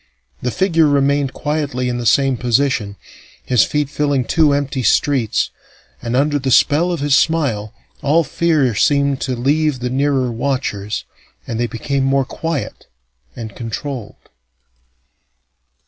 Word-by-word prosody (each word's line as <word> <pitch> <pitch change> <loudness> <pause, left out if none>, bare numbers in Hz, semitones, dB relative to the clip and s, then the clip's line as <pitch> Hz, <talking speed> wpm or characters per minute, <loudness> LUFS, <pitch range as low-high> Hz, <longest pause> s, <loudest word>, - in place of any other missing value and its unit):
The 125 - -1
figure 165 0 +2
remained 140 -1 +2
quietly 145 -5 -2
in 120 0 -2
the 120 - -1
same 135 +3 +3
position, 120 -4 0 0.5
his 125 -3 +4
feet 150 -1 -1
filling 140 -2 0
two 155 +1 +3
empty 140 -1 -1
streets, 125 0 +1 0.5
and 120 0 -3
under 145 +2 +2
the 135 -1 -2
spell 155 +7 +3
of 170 -5 -3
his 145 -1 +3
smile 140 -10 +1 0.3
all 150 +4 +3
fear 155 -6 +1
seemed 140 +3 +2
to 130 -1 -1
leave 145 +3 +1
the 125 0 -4
nearer 135 -2 +1
watchers, 115 -5 -3 0.4
and 115 - -4
they 120 - +1
became 135 +4 -2
more 135 0 +2
quiet 160 +1 -5 0.5
and 110 -3 -8
controlled. 120 0 -5
135 Hz, 135 wpm, -18 LUFS, 125-145 Hz, 0.5 s, his